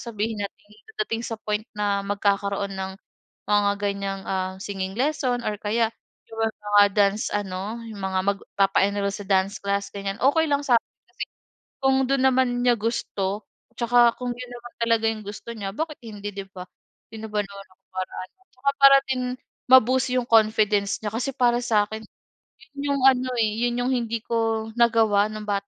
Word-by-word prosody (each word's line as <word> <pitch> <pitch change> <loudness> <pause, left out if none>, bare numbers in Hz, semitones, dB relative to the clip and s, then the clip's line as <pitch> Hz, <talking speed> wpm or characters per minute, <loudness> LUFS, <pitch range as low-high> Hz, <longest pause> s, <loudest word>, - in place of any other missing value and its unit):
sabihin 220 -2 -3
natin 205 +1 -10 0.3
dadating 415 - -1
sa 225 - -4
point 210 0 0 0.2
na 205 -1 +1
magkakaroon 200 0 0
ng, 190 0 -4 0.6
mga 205 -1 +3
ganyang 200 -1 -2
ah, 185 -1 -2
singing 190 -2 -4
lesson 260 -2 0
or 210 -1 -2
kaya 220 +2 +1 0.4
yung 225 - -5 0.2
mga 205 0 +4
dance 205 +1 +3
ano, 200 +3 -4
yung 220 -3 -8
mga 190 -1 0
magpapa-enroll 200 0 0
sa 200 0 -7
dance 195 0 +1
class 200 0 -1
ganyan. 200 -1 -4
Okey 320 +4 +4
lang 285 0 +1
sa'kin 245 -4 +3 0.2
kasi - - -6 0.6
kung 270 0 +3
dun 275 0 +1
naman 255 -2 +2
niya 245 -1 +5
gusto, 210 -3 -2 0.3
'tsaka 240 0 +4
kung 250 -1 -2
yun 250 0 -9
naman 240 0 -10
talaga 230 -1 +2
yung 220 -1 -2
gusto 210 +3 -7
niya 200 -3 -4
bakit 305 +8 -4
hindi 210 -3 -7
di 200 - -4
ba? 185 -1 -9 0.5
Sino 220 0 -7
ba 210 0 -1
naman 200 0 -11
ako 185 - -27
para 185 0 -4
ano, 185 - -31
'tsaka 265 +2 -1
para 275 0 +9
din 260 -1 0 0.5
ma-boost 260 0 +6
yung 250 -1 +1
confidence 215 -3 +3
niya. 210 -1 -3
Kasi 235 +4 -1
para 240 -1 +3
sa'kin, 220 -2 +1 0.8
yun 280 0 0
yung 275 - -2
ano 255 -1 +5
eh, 220 -2 +2 0.2
yun 240 0 -2
yung 255 - 0
hindi 230 -2 -2
ko 225 -1 -1
nagawa 220 -3 +4
nung 215 0 -6
bata. 200 -1 -2
215 Hz, 175 wpm, -24 LUFS, 200-240 Hz, 0.8 s, para